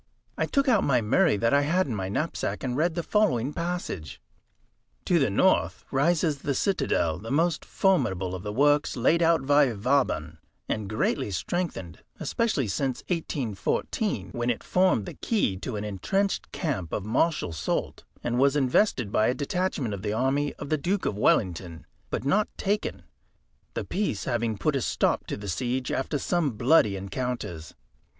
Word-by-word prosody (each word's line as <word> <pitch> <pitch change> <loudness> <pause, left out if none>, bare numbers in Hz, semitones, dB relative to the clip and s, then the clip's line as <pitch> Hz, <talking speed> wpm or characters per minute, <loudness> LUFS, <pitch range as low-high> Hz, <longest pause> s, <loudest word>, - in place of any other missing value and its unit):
I - - -1
took 275 -1 +1
out 225 -6 +4
my 130 -3 +3
Murray 135 - +3
that 115 +4 +1
I 140 - +5
had 170 +6 +2
in 130 - -3
my 95 -3 -3
knapsack, 150 +10 -2
and 125 -2 -2
read 160 +4 +1
the 170 - -2
following 150 - +1
passage: 170 - -4 0.9
"To - - +3
the - - +3
N., - - +3 0.2
rises 155 +1 +2
the 140 0 -2
citadel, 85 - 0
the 115 - -8
most 160 +4 +1
formidable 105 - +1
of 95 - -5
the 105 - -4
works 145 +4 +2
laid 165 +8 +3
out 165 -4 +3
by 145 -2 +4
Vauban, 100 - 0 0.3
and 105 -2 -2
greatly 110 -1 0
strengthened, 95 - -3 0.2
especially 215 - 0
since 130 +6 -2
1814, 140 - -2
when 120 0 -2
it 120 - -1
formed 180 - +2
the - - -7
key 205 - 0
to 110 +4 -5
an 105 - -3
entrenched 195 - -1
camp 130 - -3
of 100 - -2
Marshal 120 - +1
Soult, 75 - -2 0.2
and 120 +1 0
was 140 +1 +4
invested 130 - +2
by 110 -1 +3
a 125 - +1
detachment 145 - -1
of 100 - -5
the 105 0 -2
army 135 +5 0
of - - -8
the 155 - +1
Duke 185 +7 -1
of - - 0
Wellington, 90 -5 0 0.2
but - - -3
not 205 +9 +2
taken, 205 +2 -2 0.7
the - - -2
peace 185 - -2
having 115 -3 -1
put 150 +8 0
a 135 - 0
stop - - 0
to - - -3
the 100 0 -8
siege 125 +7 -2
after 135 +3 -1
some 160 -3 0
bloody 115 -2 +4
encounters. 95 -4 -4
130 Hz, 170 wpm, -27 LUFS, 105-165 Hz, 0.9 s, I